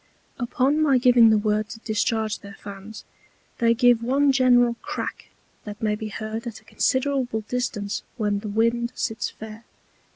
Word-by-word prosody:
Upon 265 +5 +1
my 280 -4 +4
giving 245 -2 +6
the 220 - +4
Word 210 0 0
to 225 - -9
discharge 220 0 -1
their 200 0 -11
Fans, 200 +2 -10 0.5
they 230 0 +3
give 245 -1 +4
one 275 +4 +2
general 245 -2 +4
Crack - - -5 0.4
that 210 -1 -8
may 215 -1 0
be 215 +1 -4
heard 220 +2 -5
at 225 -2 -7
a - - -26
considerable 260 -3 0
distance 215 -3 -3 0.2
when 205 -3 0
the 210 0 -6
Wind 230 +3 0
sits 225 -4 -2
fair. 220 +1 -10
225 Hz, 160 wpm, -24 LUFS, 215-245 Hz, 0.5 s, giving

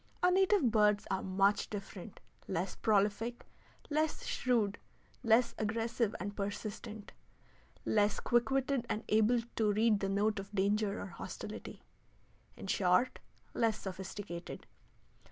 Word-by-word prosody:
Our 360 - +6
native 380 - +4
birds 210 -1 +3
are 190 - 0
much 195 +2 +2
different, 200 -1 -8 0.3
less 185 0 -2
prolific, 215 +3 +1 0.5
less 310 +1 0
shrewd, 225 -5 +1 0.4
less 235 0 +4
aggressive 225 0 0
and 205 +2 -4
persistent, 205 +1 -5 0.7
less 210 -1 +2
quick 240 0 +2
witted 270 -2 0
and 215 -1 -1
able 220 +3 +4 0.2
to 215 -2 +3
read 215 0 +3
the 195 - -1
note 205 +1 +1
of 200 +1 -8
danger 205 +1 +1
or - - -4
hostility - - -8 0.7
in - - -8
short, 185 +4 +2 0.3
less 225 -2 +1
sophisticated. 190 -1 -6
210 Hz, 120 wpm, -33 LUFS, 200-235 Hz, 0.7 s, Our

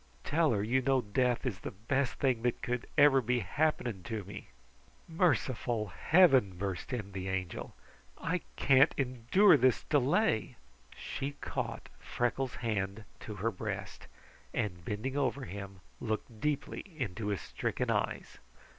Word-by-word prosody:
Tell 160 +1 +2
her 105 -3 +1
you 125 +5 +2
know 135 0 +2
death 125 +4 0
is 105 -7 -2
the - - -5
best 125 +7 -1
thing 130 -4 +1
that 120 0 -1
could 125 -1 -2
ever 145 -2 +7
be 125 +1 +1
happening 120 -1 0
to 110 -3 -3
me!" 100 +2 -9 0.6
"Merciful 130 - +1
Heaven!" 130 - +4
burst 95 +3 -4
in 105 -6 -4
the 95 -1 -5
Angel. 95 -2 -4 0.4
"I 175 +1 -1
can't 135 +2 +5
endure 135 - +4
this 130 -1 +3
delay!" 140 - +2 0.4
She 140 +1 -4
caught 145 - -4
Freckles' 125 +1 -1
hand 100 -1 -1 0.2
to 105 - -7
her 110 +4 -1
breast, 90 - -6 0.5
and 90 -6 -2
bending 110 +9 -3
over 135 -1 0
him, 100 -1 -8 0.2
looked 110 0 -4
deeply 150 -2 -1 0.2
into 110 -3 -3
his 100 -2 -1
stricken - - -2
eyes. - - -2
120 Hz, 140 wpm, -32 LUFS, 105-135 Hz, 0.6 s, ever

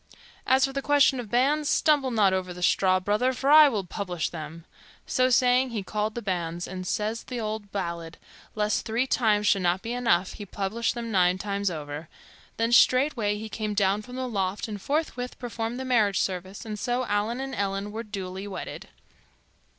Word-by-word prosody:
As 265 +1 +5
for 270 - -5
the 275 - -2
question 285 -2 +4
of 235 -4 -6
banns, 285 +6 +2
stumble 295 -4 +3
not 210 -5 +3
over 185 -1 -2
that 180 - -6
straw, 185 +1 +3
brother, 210 +7 +1
for 270 +3 0
I 305 -1 +9
will 210 -6 -2
publish 180 -2 -3
them." 160 0 -8 0.4
So 255 -1 +2
saying, 250 +1 +4
he 220 -4 -4
called 210 +2 -2
the 235 - -4
banns; 175 -3 -3
and, 185 0 -6
says 220 +3 -2
the 250 -2 -5
old 215 -2 -4
ballad, 170 -4 -4 0.4
lest 210 0 0
three 230 +3 0
times 215 -5 +2
should 200 -1 +3
not 180 +2 +1
be 230 +1 -3
enough, 230 -7 +1
he 210 - -8
published 210 +6 -2
them 235 -1 -4
nine 180 -2 +3
times 200 0 -1
o'er. 150 -1 -6 0.5
Then 230 +1 0
straightway 240 -4 +4
he 220 +1 -6
came 215 -1 -4
down 200 0 +2
from 250 +4 -10
the 260 0 -3
loft 195 -3 -2
and 205 -2 -6
forthwith 275 -3 -2
performed 235 0 -4
the 260 - -4
marriage 215 -6 +2
service; 190 +3 -3
and 210 -1 -5
so 245 +3 -1
Allan 215 +3 -1
and 270 0 -4
Ellen 200 -1 -2
were 220 +2 -4
duly 195 -3 -6
wedded. 195 - -7
210 Hz, 190 wpm, -26 LUFS, 190-245 Hz, 0.5 s, I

